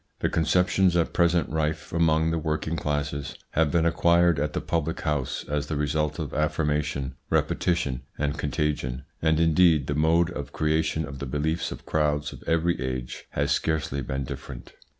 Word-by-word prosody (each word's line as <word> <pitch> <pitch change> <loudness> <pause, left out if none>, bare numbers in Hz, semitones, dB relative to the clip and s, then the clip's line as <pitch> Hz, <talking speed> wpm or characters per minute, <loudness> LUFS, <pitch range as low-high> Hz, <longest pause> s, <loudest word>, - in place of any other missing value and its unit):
The - - +2
conceptions 90 +2 +3
at 85 - +1
present 85 -1 +3
rife 75 0 -2
among 80 -1 +3
the 80 - 0
working 80 +1 -2
classes 75 -2 -2 0.2
have 80 -1 +2
been 80 +2 +2
acquired 85 -1 +4
at 75 +1 -1
the - - 0
public 80 -1 -2
house 75 -5 -2
as 75 -1 -2
the 75 - -2
result 75 +1 0
of 80 -5 -4
affirmation, 75 -3 0 0.2
repetition, 70 -8 0 0.2
and 75 0 -1
contagion, 75 -3 -2 0.2
and 80 0 +2
indeed 80 -2 +4
the 75 - -1
mode 80 +3 +3
of 75 - -6
creation 80 0 0
of 70 -1 -8
the 70 - -4
beliefs 80 +5 -1
of - - -8
crowds 75 -1 0
of - - -12
every 85 +1 +1
age 65 -1 -4
has - - -1
scarcely 75 -3 0
been 65 +1 -3
different. - - -8
75 Hz, 170 wpm, -26 LUFS, 75-80 Hz, 0.2 s, acquired